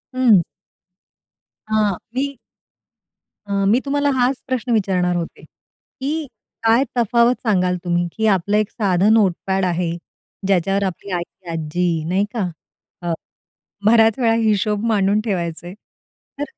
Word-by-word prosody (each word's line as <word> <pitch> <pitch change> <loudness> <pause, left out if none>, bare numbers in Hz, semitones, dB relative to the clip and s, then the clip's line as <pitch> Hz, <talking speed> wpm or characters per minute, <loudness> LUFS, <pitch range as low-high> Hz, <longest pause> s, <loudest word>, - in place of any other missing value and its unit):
हं. 230 -8 +5 1.3
आ, 210 -3 +1 0.2
मी 280 +1 -2 1.1
अ, - - -7 0.2
मी 225 +5 +4
तुम्हाला 285 +1 +1
हाच 250 +2 +2
प्रश्न 255 -1 -2
विचारणार 185 -5 +1
होते, 170 -1 -4
की 300 +4 -7 0.4
काय 225 +3 +4
तफावत 235 +1 +3
सांगाल 180 -3 +2
तुम्ही, 175 -1 0
की 220 0 +2
आपलं 205 +1 +2
एक 215 0 +1
साधं 200 -1 +2
नोटपॅड 190 -2 +1
आहे. 175 -1 0 0.6
ज्याच्यावर 195 +1 +2
आपली 190 +1 -4
आई, 175 -1 -1 0.3
आजी 165 +1 -1
नाही 190 +3 +2
का? 215 -6 -1 0.5
अ, 175 -1 -1 0.7
बऱ्याच 225 0 +5
वेळा 230 -3 +3
हिशोब 210 0 +1
मांडून 205 -2 +2
ठेवायचे. 175 -4 -3
तर 280 +6 -12
205 Hz, 125 wpm, -20 LUFS, 180-230 Hz, 1.3 s, हं